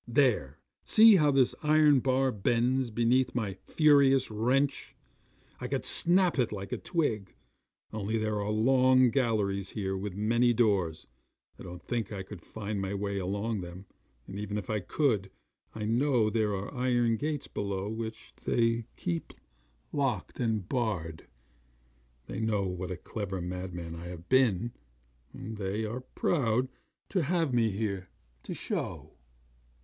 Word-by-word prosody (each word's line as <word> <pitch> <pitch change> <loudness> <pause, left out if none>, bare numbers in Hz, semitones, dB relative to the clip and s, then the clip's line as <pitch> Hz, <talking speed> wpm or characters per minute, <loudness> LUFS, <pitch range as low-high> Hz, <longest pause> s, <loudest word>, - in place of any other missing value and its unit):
There 115 - +2 0.3
see 220 -2 +7
how 150 -3 +4
this 135 -3 +3
iron 150 -2 +5
bar 130 +1 +2
bends 120 +4 +1
beneath 120 +3 +2
my 110 -6 -1
furious 135 - +3
wrench. 130 +6 0 0.6
I - - -4
could - - -2
snap 175 -3 +3
it 120 - +1
like 100 -2 -6
a - - -2
twig, 110 - -1 0.6
only 110 +1 -1
there 110 -1 -1
are 100 - -2
long 130 +3 +4
galleries 105 -7 0
here 95 -2 -1
with 95 0 -4
many 115 +4 +2
doors 100 -9 +1 0.5
I - - -11
don't 90 -1 -9
think 115 -4 -3
I 100 -2 -4
could 95 -2 -10
find 105 -2 -5
my 95 +1 -3
way 100 0 -2
along 100 +3 -2
them; 90 +2 -9 0.4
and 95 - -7
even 105 0 -3
if 105 0 -4
I 105 - 0
could, 105 - 0 0.5
I 110 -1 -3
know 120 -1 +2
there 105 -2 +1
are 95 +6 -5
iron 120 -3 +2
gates 150 +3 -3
below 100 -1 -3
which 110 +1 -6
they 115 -1 +1
keep 85 -1 -3 0.6
locked 135 -9 -1
and 110 -6 -1
barred. 95 - -2 1.0
They 100 - -6
know 110 -3 +1
what 90 0 -4
a 90 - -4
clever 95 0 -5
madman 90 -1 -5
I 85 +1 -8
have 85 0 -9
been, 120 -4 +3 0.6
and 110 -1 -7
they 100 +2 -2
are 115 +4 -4
proud 130 -3 0 0.4
to 190 - +1
have 165 -2 0
me 115 -2 +3
here, 100 -3 -3 0.3
to - - -6
show. - - -4
110 Hz, 150 wpm, -30 LUFS, 100-130 Hz, 1.0 s, see